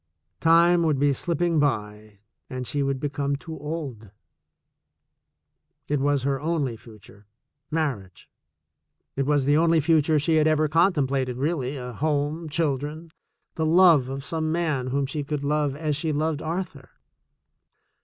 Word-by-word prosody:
Time 170 +1 +5
would 155 -4 +1
be 140 +1 +2
slipping 170 +3 0
by 105 -6 -2 0.3
and 130 -1 -5
she 145 +3 -2
would 135 -1 -1
become 145 0 -2
too 160 +3 -8
old. 145 -9 -6 1.8
It 145 -1 0
was 140 -1 +1
her 135 0 -1
only 150 -6 -1
future 105 -2 -16 0.2
— 140 -1 -56
mar 145 -7 0
riage. 95 -2 -17 0.9
It 135 0 -1
was 145 -2 +2
the 145 +2 +3
only 165 0 +4
future 155 0 +3
she 160 +2 +2
had 155 0 +3
ever 155 0 +2
contem 165 -2 +2
plated 130 -2 -2
really, 140 -1 -2
a 125 -1 -6
home, 150 +4 -1
children, 150 +1 -2 0.4
the 160 - -2
love 165 -6 +5
of 135 +1 -5
some 160 0 -2
man 155 -6 -1
whom 140 +2 0
she 145 +2 -4
could 145 0 -4
love 145 -1 0
as 150 -1 -2
she 155 +2 -2
loved 155 +1 -1
Arthur. 160 -5 -5
145 Hz, 155 wpm, -25 LUFS, 135-160 Hz, 1.8 s, Time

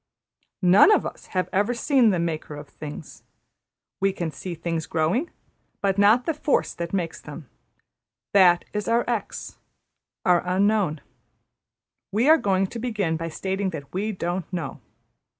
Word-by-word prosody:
None 185 - +7
of - - +3
us - - -7
have 185 -1 -1
ever 210 +5 +1
seen 255 -1 +3
the 190 - +1
Maker 160 -3 -3
of 145 0 -9
things. 150 0 -9 0.8
We 195 0 +2
can 170 -3 -4
see 175 +2 -6
the - - -24
things 165 -1 -3
growing, 165 - 0 0.5
but 195 0 0
not 215 +5 +5
the 325 - 0
force 300 -1 0
that 170 -1 -5
makes 175 -4 -3
them. 150 -1 -10 0.9
\emph{That} 180 -3 +6
is 210 0 -3
our 235 +1 +2
X; 235 -3 -4 0.7
our 180 -2 +4
Unknown. 185 -3 +1 1.1
We 225 +7 +2
are 320 +1 +7
going 195 -1 +1
to 230 +5 -7
begin 210 -9 -1
by 165 +1 -4
stating 190 +4 -2
that 145 -6 -8
we 205 +4 -1
don't 180 -2 -4
know. 175 -3 -4
190 Hz, 155 wpm, -24 LUFS, 170-210 Hz, 1.1 s, None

